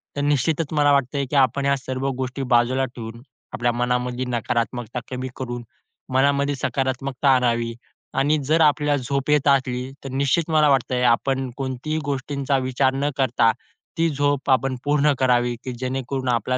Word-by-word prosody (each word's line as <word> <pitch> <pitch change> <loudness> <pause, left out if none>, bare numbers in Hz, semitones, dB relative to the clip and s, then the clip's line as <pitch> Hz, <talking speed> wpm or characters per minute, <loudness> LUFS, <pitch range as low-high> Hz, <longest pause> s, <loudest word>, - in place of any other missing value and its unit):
तर 145 - -2
निश्चितच 145 +2 +1
मला 145 -1 +4
वाटतंय 140 0 +1
की - - -3
आपण 140 +1 +3
ह्या 140 0 +3
सर्व 130 0 -4
गोष्टी 130 +1 -3
बाजूला 125 +3 +3
ठेवून, 115 -2 -9 0.3
आपल्या 120 0 +1
मनामधली 125 +1 -1
नकारात्मकता 120 0 -2
कमी 130 0 -3
करून, 120 -2 -5 0.5
मनामध्ये 140 +1 +2
सकारात्मकता 135 +1 -1
आणावी 120 -2 +1 0.5
आणि 150 +3 +3
जर 160 +4 +3
आपल्याला 145 -2 +3
झोप 140 +2 -2
येत 150 -1 +3
असली 130 -2 +1
तर 135 - -6
निश्चित 140 +5 +1
मला 155 -1 +4
वाटतंय 130 -2 +1
आपण 130 +2 +1
कोणतीही 135 +3 -3
गोष्टींचा 140 0 -1
विचार 130 0 +1
न 140 +2 0
करता 120 -4 +3 0.5
ती 165 0 +2
झोप 145 -1 0
आपण 130 0 +2
पूर्ण 145 0 +3
करावी 120 -2 +2 0.2
जेणेकरून 130 0 -3
आपला 125 +1 0
130 Hz, 150 wpm, -22 LUFS, 125-140 Hz, 0.5 s, मला